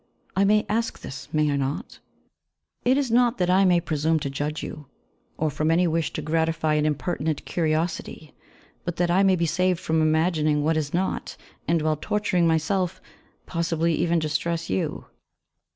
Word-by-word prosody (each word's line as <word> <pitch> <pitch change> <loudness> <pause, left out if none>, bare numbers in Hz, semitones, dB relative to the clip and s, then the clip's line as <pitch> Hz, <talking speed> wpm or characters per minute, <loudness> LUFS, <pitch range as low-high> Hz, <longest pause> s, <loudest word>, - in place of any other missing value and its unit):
I 195 +1 +3
may 210 +1 +3
ask 225 +3 -1
this, 135 - -8
may 155 -1 +2
I - - 0
not? 135 +1 -3 0.8
It 255 +2 +3
is 275 -5 0
not 240 +1 +3
that 180 0 +1
I 190 +1 +5
may 180 -2 +4
presume 160 -1 0
to 140 - -3
judge 150 +2 -3
you, 150 -2 -7 0.5
or 155 -1 0
from 155 +3 -1
any 170 +2 +3
wish 165 -1 0
to 155 - -4
gratify 160 0 0
an 150 0 +2
impertinent 150 +1 -2
curiosity, 160 -1 -2 0.5
but 175 -2 -3
that 175 0 +1
I 185 +2 +4
may 195 -1 +4
be 170 -1 0
saved 180 +2 +1
from 160 -3 0
imagining 155 -1 +2
what 160 +2 +2
is 150 -2 -1
not, 185 +2 -2 0.3
and, 165 -1 +2
while 155 -1 +1
torturing 205 -2 +1
myself, 180 +3 0 0.5
possibly 165 -1 0
even 170 +1 +1
distress 165 - -1
you. 95 - -2
165 Hz, 170 wpm, -25 LUFS, 155-180 Hz, 0.8 s, I